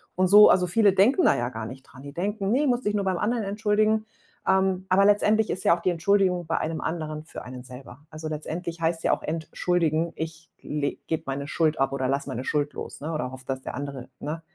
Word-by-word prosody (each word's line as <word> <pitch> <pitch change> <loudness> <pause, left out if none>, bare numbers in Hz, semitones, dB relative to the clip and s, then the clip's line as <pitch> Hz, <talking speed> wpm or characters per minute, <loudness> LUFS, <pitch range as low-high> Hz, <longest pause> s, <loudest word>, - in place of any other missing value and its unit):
Und 185 0 +3
so 210 +2 +9
also, 180 -1 +4
viele 205 +1 +4
denken 230 - +4
da - - +5
ja 120 +1 -1
gar 110 -2 -6
nicht 130 +4 -9
dran, 135 0 -15
die 140 0 -9
denken: 200 +3 -2
„Ne, 280 +4 +2
musst 245 -1 0
dich 210 - +1
nur 205 -1 0
beim 185 -2 0
anderen 225 +3 0
entschuldigen.“ 215 +1 +1 0.4
Ähm, 190 -1 +2
aber 195 +2 +5
letztendlich 210 +1 +3
ist 185 - -3
ja - - +5
auch - - -9
die 185 - +1
Entschuldigung 180 0 +2
bei 165 - -1
einem 160 0 -2
anderen 155 -2 -4
für - - -9
einen 125 0 -9
selber. 125 0 -11
Also, 155 0 -7
letztendlich 165 +2 -5
heißt 165 0 0
ja - - +4
auch - - -3
entschuldigen, 165 0 0
ich 160 0 -6
le 145 -1 -2
gebe 160 - -2
meine 140 +1 -3
Schuld 160 -1 +1
ab 135 0 +1
oder 130 -1 -1
lasse 140 +1 -1
meine 125 - -4
Schuld 145 +1 -1
los, - - -7
ne, 160 +3 -4
oder 130 -4 -3
hoffe, 130 0 -10
dass 130 -1 -3
der - - -6
andere, 140 -2 -6
ne, 155 +3 -5
165 Hz, 235 wpm, -26 LUFS, 145-195 Hz, 0.4 s, so